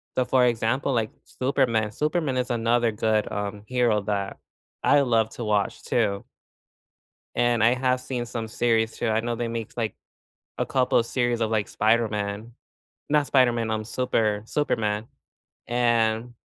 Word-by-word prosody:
So, 130 - +3
for 130 -1 +3
example, 120 +3 0
like, 115 -3 0
Superman, 125 -5 0
Superman 150 +1 -1
is 125 0 -1
another 120 0 +2
good, 110 0 +1
um, 105 0 -4
hero 120 -4 +2
that 100 -1 -2 0.5
I 145 0 +5
love 115 -4 +2
to 120 - -6
watch 105 -2 0
too. 100 +1 0 1.1
And 120 -2 +2
I 115 +2 +5
have 125 0 +1
seen 125 -2 -4
some 115 -1 -5
series 115 -1 +1
too. 120 - -1
I 110 0 +2
know 120 +1 -2
they 120 0 -2
make 115 -2 -5
like 115 -3 -2 0.6
a - - 0
couple 130 -2 +2
series 120 0 -1
of 110 - +1
like 110 -2 0
Spider-Man. 110 -1 0 0.6
Not 150 -1 +2
Spider-Man, 120 -4 +2
um, 110 0 -2
Super 110 -3 0
Superman. 110 -6 -1 0.6
And 120 -1 +1
115 Hz, 150 wpm, -25 LUFS, 110-125 Hz, 1.1 s, I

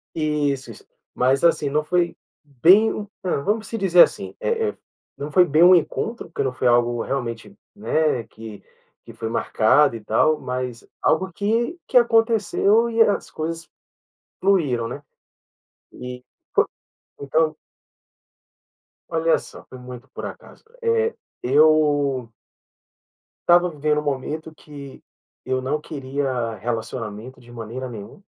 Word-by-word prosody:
Isso, 145 -5 -1
isso. 110 - -14 0.3
Mas, 130 +3 +2
assim, 165 -4 +3
não 150 +2 0
foi 170 +1 0 0.3
bem 190 - +3 0.2
ah, 185 - 0
vamos 210 +10 -1
se 230 - -4
dizer 185 -4 +7
assim, - - -3
eh 465 -3 0
eh, - - -9 0.4
não 145 +2 -6
foi 180 +3 +6
bem 155 +1 +4
um 180 +1 +8
encontro, 225 +7 -2
porque 160 - -2
não 130 -1 -2
foi 125 - 0
algo 120 -1 +2
realmente, 120 - -4 0.2
né, 155 - 0
que 110 -2 -11 0.4
que - - -11
foi 115 - -5
marcado 115 +4 +3
e 110 - -8
tal, 150 +9 +2
mas 125 -2 -5 0.2
algo 190 +4 +1
que 230 - -1
que - - +3
aconteceu 225 -1 +3
e 230 0 -3
é 225 - +6
as 205 - -2
coisas 165 +1 -5 0.7
fluíram, 150 -12 +1
né? 140 +5 -7 0.9
E 125 0 -8 0.3
foi - - +4 0.6
então 155 +3 +1 1.5
Olha 165 0 +2
só, - - -12
foi 130 - -10
muito 125 +1 -11
por - - -7
acaso, - - -11 0.2
eh, 460 0 +1 0.3
eu 145 -3 +3 1.2
estava 175 +1 +6
vivendo 150 -1 0
um - - -10
momento 150 +3 -4
que 145 -3 -12 0.4
eu 130 0 -1
não 135 +4 -1
queria 135 -5 -3
relacionamento 115 +2 -5
de 120 -1 -18
maneira 120 +2 -6
nenhuma, 110 - -10
145 Hz, 140 wpm, -22 LUFS, 125-175 Hz, 1.5 s, um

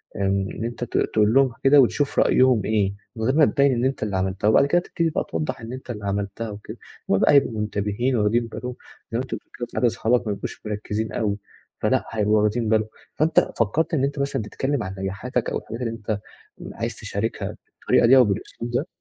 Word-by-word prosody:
إن 100 +1 -1
أنت 120 +1 -4
تق - - -1
تقول 105 +1 +3
لهم 135 -2 +4
كده 140 +1 +7
وتشوف 140 +3 +1
رأيهم 130 -4 +4
إيه 100 -3 +1 0.2
من 110 - -4
غير 130 +5 +2
ما 155 -2 +6
تبيّن 140 -1 +3
إن 120 +1 0
أنت 135 -4 -1
اللي 100 -3 -1
عملتها 95 +2 -1
وبعد 110 - +5
كده 175 +5 +2
تبتدي 165 -1 -1
بقى - - -2
توضّح 80 +6 -3
إن 115 +2 -7
أنت 130 0 -9
اللي 105 -3 -7
عملتها 100 +3 -3
وكده، 105 0 -9 0.3
هُم 95 - +4
بقى - - +4
هيبقوا 120 -6 +3
منتبهين 105 +5 -1
وواخدين 115 +2 +2
بالهم، 125 +2 -6 0.4
زي 115 - -1
ما - - -1
أنت 130 - -5
بتقول - - -9 0.2
كده 120 - -3
ساعات 125 - 0
صحابك 120 +1 +1
ما 105 - 0
بيبقوش - - -7
مركّزين 105 +1 -3
أوي، 105 -2 -1 0.4
فلأ - - +1
هيبقوا 105 -1 +2
واخدين 110 +1 0
بالهم، 110 -1 +2 0.3
فأنت 155 +2 +2
فكّرت 155 - +1
إن 135 - +2
أنت 140 +1 -1
مثلًا 140 -3 -1
تتكلّم 130 +3 -2
عن 95 0 -6
نجاحاتك 110 +6 -2
أو - - -1
الحاجات 115 +3 -8
اللي 115 -2 -1
أنت 110 -2 -3 0.5
عايز - - -4
تشاركها 105 +3 -4 0.2
بالطريقة 115 - +3
دي 135 +2 +7
أو 125 - +8
بالأسلوب 110 +3 -4
ده؟ 140 +8 -1
115 Hz, 210 wpm, -23 LUFS, 105-130 Hz, 0.5 s, أو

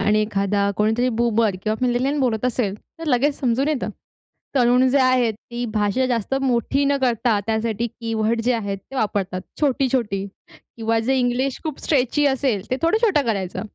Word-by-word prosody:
आणि 210 +2 +3
एखादा 200 -1 0
कोणीतरी 220 +4 +2
बूमर 225 -4 +2
किंवा 215 0 0
मिलेनियल 255 +4 0
बोलत 240 -3 0
असेल 235 -5 0 0.2
तर 330 - -7
लगेच 280 +1 +2
समजून 260 +2 +1
येतं. 300 -4 -1 0.7
तरुण 250 +1 +4
जे 280 - +3
आहेत 255 -3 +3 0.2
ती 240 +1 -3
भाषा 210 +4 +1
जास्त 240 0 -1
मोठी 270 +2 +1
न 280 0 +2
करता 235 -3 +2
त्यासाठी 225 +1 -1
कीवर्ड 225 0 -2
जे 245 +2 +1
आहेत 200 -4 -2
ते 270 - -14
वापरतात. 195 -6 -1 0.2
छोटी-छोटी 250 -8 +1 0.3
किंवा 225 0 -2
जे 260 +4 +1
इंग्लिश 250 +2 0
खूप 310 -4 -4
स्ट्रेची 290 0 +1
असेल 265 -7 0
ते - - +3
थोडं 335 +6 +3
छोटं 390 -11 +3
करायचं. 195 -5 -2
240 Hz, 165 wpm, -22 LUFS, 215-260 Hz, 0.7 s, तरुण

